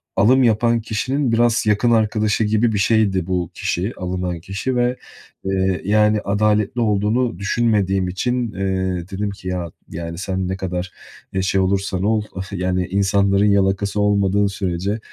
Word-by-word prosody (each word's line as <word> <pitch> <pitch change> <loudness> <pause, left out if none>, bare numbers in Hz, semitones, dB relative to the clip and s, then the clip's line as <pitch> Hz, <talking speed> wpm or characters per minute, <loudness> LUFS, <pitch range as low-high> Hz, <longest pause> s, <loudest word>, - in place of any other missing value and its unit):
alım 130 +5 +4
yapan 115 0 +2
kişinin 130 +5 -1
biraz 115 0 +2
yakın 105 +3 +2
arkadaşı 110 -1 +2
gibi 110 +2 +2
bir - - 0
şeydi 100 -4 +2
bu 90 -3 -1
kişi, 95 +6 -2
alınan 90 -1 -3
kişi 100 +9 -3
ve, 125 0 +1 0.5
eee, 95 -1 0
yani, 105 +1 +3
adaletli 105 +3 +1
olduğunu 105 0 +1
düşünmediğim 100 -3 +1
için, 120 +5 -1
eee, 95 -2 -2
dedim 100 +2 -2
ki 100 -1 -10
"Ya, 90 -2 -3 0.2
yani, 85 0 -6
sen 95 0 -2
ne 95 +1 -3
kadar, 90 -1 -4 0.4
eee, 95 - 0
şey 95 +1 +1
olursan 95 0 0
ol, 110 +1 +1 0.3
yani, 90 -1 -1
insanların 100 +1 +2
yalakası 100 0 +1
olmadığın 100 0 +2
sürece, 100 +1 -2
100 Hz, 145 wpm, -20 LUFS, 95-110 Hz, 0.5 s, alım